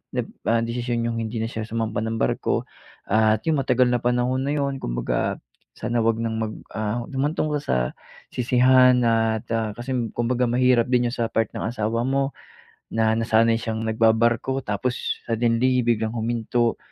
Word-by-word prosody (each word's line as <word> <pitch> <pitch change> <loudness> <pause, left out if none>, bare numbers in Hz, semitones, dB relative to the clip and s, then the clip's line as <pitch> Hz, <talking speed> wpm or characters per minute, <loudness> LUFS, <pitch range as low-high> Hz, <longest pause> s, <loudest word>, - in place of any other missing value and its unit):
nag - - -1 0.2
ah, 115 0 +3
desisyon 120 0 -2
iyong 115 0 -2
hindi 115 +1 -4
na - - 0
siya 110 -2 -4
sumampa 110 -1 -2
ng 110 0 -2
barko - - 0 0.4
at 110 +1 +2
yung 155 -4 +2
matagal 125 -1 +3
na 125 -1 +1
panahon 125 +1 +1
na 145 - 0
iyon 140 -2 -2
kumbaga - - -1 0.4
sana 120 0 -1
huwag 115 0 +2
nang 110 -1 -2
mag 110 -1 -2 0.2
ah, 110 +2 -2
humantong 145 +3 -1
pa 150 - 0
sa 145 - -1 0.6
sisihan 125 +1 +5
at 115 -1 +1
ah, 110 -2 0
kasi 120 +2 -4 0.2
kumbaga 120 +1 0
mahirap 125 -1 +3
din 125 -1 +3
yun - - -5
sa 115 -1 -1
part 115 -2 0
ng - - -5
asawa 115 0 -1
mo 135 +1 0 0.6
na 110 0 +2
nasanay 115 0 +3
siyang 110 -1 -3
nagbabarko 115 +4 +2
tapos 105 +5 -2
suddenly 120 +2 +2
biglang 115 -2 0
huminto 115 0 0
115 Hz, 165 wpm, -23 LUFS, 110-125 Hz, 0.6 s, sisihan